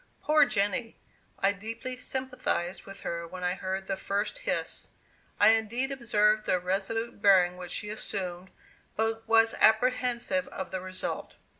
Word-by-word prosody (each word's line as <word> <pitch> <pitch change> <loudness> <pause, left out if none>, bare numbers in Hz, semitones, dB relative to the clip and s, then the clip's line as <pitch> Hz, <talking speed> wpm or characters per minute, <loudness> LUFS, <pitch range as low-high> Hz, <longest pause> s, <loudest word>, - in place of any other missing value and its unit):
Poor 305 0 +5
Jenny! 205 +3 0 0.4
I 195 - +3
deeply 230 +5 -6
sympathized 255 -8 -3
with 195 - -10
her 170 0 -4
when 185 +1 -8
I 180 0 +1
heard 190 +1 -4
that 190 0 -3
first 205 - -2
hiss. - - -3 0.5
I - - +7
indeed 225 +4 +1
observed 215 -4 +2
the 185 - +3
resolute 200 +5 -2
bearing 185 -3 +5
which 180 -1 -8
she 210 - -3
assumed, 185 -4 -4 0.5
but 225 0 -1
was 225 0 +5
apprehensive 245 +3 +3
of 190 - -6
the 185 - -3
result. 185 0 -4
210 Hz, 145 wpm, -29 LUFS, 190-235 Hz, 0.5 s, I